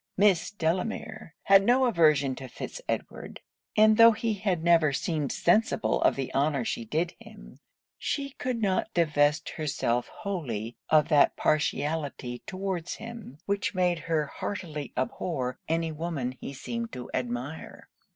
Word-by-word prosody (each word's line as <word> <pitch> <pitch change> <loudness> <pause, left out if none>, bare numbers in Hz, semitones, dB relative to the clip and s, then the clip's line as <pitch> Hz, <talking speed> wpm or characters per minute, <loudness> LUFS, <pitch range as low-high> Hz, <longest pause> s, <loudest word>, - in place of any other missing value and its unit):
Miss 195 -3 +4
Delamere 195 +2 -3
had 195 0 +6
no 250 +5 +4
aversion 155 - +3
to 130 - -7
Fitz - - -7
Edward; - - -4 0.4
and 215 0 +6
tho' 230 0 +9
he 220 +1 -1
had 190 -5 -1
never 165 -3 +4
seemed 150 0 -1
sensible 215 +5 +2
of - - +4
the 135 -2 -4
honour 140 -2 +1
she 115 - -3
did 160 +8 -1
him, - - -14 0.4
she 275 -1 -2
could 255 -3 -3
not 195 +2 +1
divest 150 -2 +2
herself 125 -6 -1
wholly 120 - -4
of 155 0 +4
that 150 -3 +5
partiality 145 -4 -1
towards 185 -3 -3
him, 225 - -9
which 200 0 -1
made 180 -2 +2
her 155 -1 0
heartily 150 -1 -5
abhor 130 -1 -2
any 165 0 0
woman 155 -5 -3
he 130 - -8
seemed 230 - -5
to 125 -1 -7
admire. 125 +5 -5
165 Hz, 140 wpm, -28 LUFS, 140-200 Hz, 0.4 s, tho